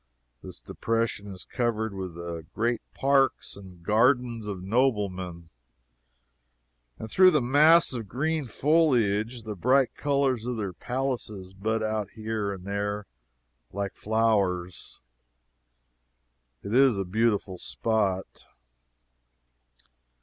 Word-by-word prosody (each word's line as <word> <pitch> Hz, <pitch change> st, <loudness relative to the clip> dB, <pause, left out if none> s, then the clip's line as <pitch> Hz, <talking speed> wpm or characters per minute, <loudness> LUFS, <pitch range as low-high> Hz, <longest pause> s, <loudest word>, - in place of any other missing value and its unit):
This -, -, -9 dB
depression 115 Hz, -2 st, -2 dB
is 95 Hz, -2 st, -8 dB
covered 110 Hz, -3 st, -1 dB
with 95 Hz, -3 st, -6 dB
the 85 Hz, -1 st, -6 dB
great 120 Hz, +1 st, 0 dB
parks 135 Hz, 0 st, +1 dB
and 95 Hz, -3 st, -13 dB
gardens 115 Hz, +2 st, +2 dB
of 95 Hz, -3 st, -5 dB
noblemen, 95 Hz, -7 st, -1 dB, 1.5 s
and 110 Hz, -, -7 dB
through 185 Hz, 0 st, +7 dB
the 155 Hz, -4 st, +3 dB
mass 150 Hz, +6 st, +5 dB
of 115 Hz, -4 st, -5 dB
green 150 Hz, +5 st, -1 dB
foliage 120 Hz, -6 st, +2 dB
the 110 Hz, -1 st, -5 dB
bright 130 Hz, +6 st, +2 dB
colors 135 Hz, -5 st, 0 dB
of 125 Hz, -1 st, -2 dB
their 100 Hz, -4 st, -3 dB
palaces 120 Hz, -6 st, -4 dB
bud 110 Hz, +3 st, -1 dB
out 110 Hz, -2 st, -2 dB
here 110 Hz, -2 st, -3 dB
and 95 Hz, -2 st, -8 dB
there 100 Hz, +1 st, -3 dB, 0.7 s
like 100 Hz, 0 st, -3 dB
flowers. 100 Hz, -5 st, -1 dB, 1.6 s
It 100 Hz, -, -5 dB
is 130 Hz, -4 st, +5 dB
a 95 Hz, -, -2 dB
beautiful 100 Hz, -2 st, 0 dB
spot. 95 Hz, -, -2 dB
110 Hz, 110 wpm, -27 LUFS, 100-125 Hz, 1.6 s, through